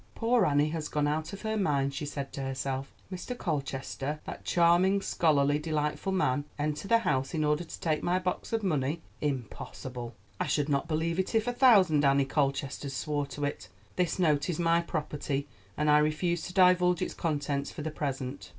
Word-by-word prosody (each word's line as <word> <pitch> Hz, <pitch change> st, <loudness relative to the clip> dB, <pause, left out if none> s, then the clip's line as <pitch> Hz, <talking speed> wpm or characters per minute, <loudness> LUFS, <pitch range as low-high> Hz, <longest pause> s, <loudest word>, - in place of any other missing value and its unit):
"Poor 230 Hz, -3 st, +3 dB
Annie 145 Hz, +1 st, +3 dB
has 155 Hz, -1 st, -4 dB
gone 150 Hz, -1 st, 0 dB
out 155 Hz, +2 st, -1 dB
of 200 Hz, -, -8 dB
her 220 Hz, 0 st, -1 dB
mind," 140 Hz, -9 st, +1 dB
she 145 Hz, +2 st, -4 dB
said 140 Hz, -1 st, -5 dB
to 140 Hz, -, -4 dB
herself. 135 Hz, 0 st, -3 dB, 0.2 s
"Mr. 190 Hz, +7 st, -5 dB
Colchester, 140 Hz, -, -3 dB
that -, -, -7 dB
charming, 175 Hz, +3 st, +4 dB
scholarly, 145 Hz, -6 st, +2 dB
delightful 150 Hz, +4 st, -1 dB
man 145 Hz, -8 st, +1 dB
enter 150 Hz, +4 st, -2 dB
the 230 Hz, -, +5 dB
house 135 Hz, -9 st, -1 dB
in 155 Hz, -, +1 dB
order 150 Hz, +2 st, +1 dB
to 165 Hz, -, -9 dB
take 155 Hz, -2 st, 0 dB
my 180 Hz, +1 st, +1 dB
box 180 Hz, -1 st, -3 dB
of 225 Hz, -1 st, 0 dB
money—impossible! 135 Hz, -, -3 dB, 0.2 s
I -, -, 0 dB
should 145 Hz, -1 st, 0 dB
not 140 Hz, +2 st, +1 dB
believe 165 Hz, +2 st, -1 dB
it 190 Hz, +4 st, -1 dB
if 220 Hz, -1 st, +3 dB
a 245 Hz, -, -1 dB
thousand 195 Hz, -, +5 dB
Annie 140 Hz, 0 st, +4 dB
Colchesters 140 Hz, -1 st, -1 dB
swore 145 Hz, -1 st, -1 dB
to 145 Hz, +1 st, -4 dB
it. 145 Hz, -, -5 dB, 0.3 s
This 180 Hz, -3 st, 0 dB
note 155 Hz, -4 st, +2 dB
is 170 Hz, -, -1 dB
my 170 Hz, 0 st, +3 dB
property, 145 Hz, -3 st, -3 dB, 0.3 s
and 150 Hz, -, 0 dB
I 150 Hz, 0 st, +6 dB
refuse 155 Hz, +3 st, 0 dB
to 180 Hz, -, -9 dB
divulge 180 Hz, -2 st, +4 dB
its -, -, -4 dB
contents 145 Hz, -3 st, -2 dB
for 150 Hz, -, -7 dB
the 155 Hz, -, -3 dB
present." 135 Hz, -2 st, -4 dB
150 Hz, 185 wpm, -29 LUFS, 140-175 Hz, 0.3 s, I